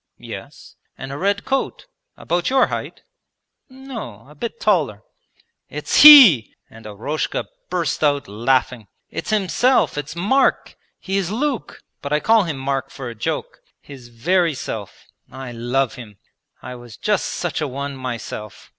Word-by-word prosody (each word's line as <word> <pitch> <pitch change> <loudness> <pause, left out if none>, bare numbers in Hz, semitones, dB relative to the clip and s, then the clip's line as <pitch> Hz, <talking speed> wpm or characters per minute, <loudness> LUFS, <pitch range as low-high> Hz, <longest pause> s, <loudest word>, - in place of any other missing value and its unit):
'Yes.' - - -11 0.2
'And 135 +1 -7
a 140 - -5
red 200 +1 0
coat? 270 0 -2 0.3
About 175 +1 -1
your 265 0 +4
height?' - - -6 0.7
'No, 255 - -9
a 150 - -15
bit 230 +10 -6
taller.' 155 - +1 0.7
'It's 150 0 +1
he!' 250 - +10 0.2
and 110 -1 -12
Eroshka 115 +9 -3 0.2
burst - - -1
out 145 -1 +1
laughing. 120 +1 0 0.2
'It's - - -5
himself, 215 - +2
it's 145 +1 -7
Mark. 210 +11 +1 0.2
He 195 +1 -2
is 190 -3 -1
Luke, 255 +3 -3 0.2
but 140 - -6
I 150 - +2
call 220 +3 +3
him 155 -5 -4
Mark 135 0 -2
for 130 -3 -7
a - - -7
joke. 110 - -4 0.2
His 135 -4 -13
very 165 +7 +1
self! 105 -6 -7 0.3
I 130 -1 -8
love 120 +2 -1
him. 110 -6 -11 0.5
I 125 - -7
was 120 -2 -12
just 210 -2 0
such 175 -2 -3
a 150 - -1
one 140 +1 -5
myself. 120 -4 -7
145 Hz, 150 wpm, -20 LUFS, 120-200 Hz, 0.7 s, he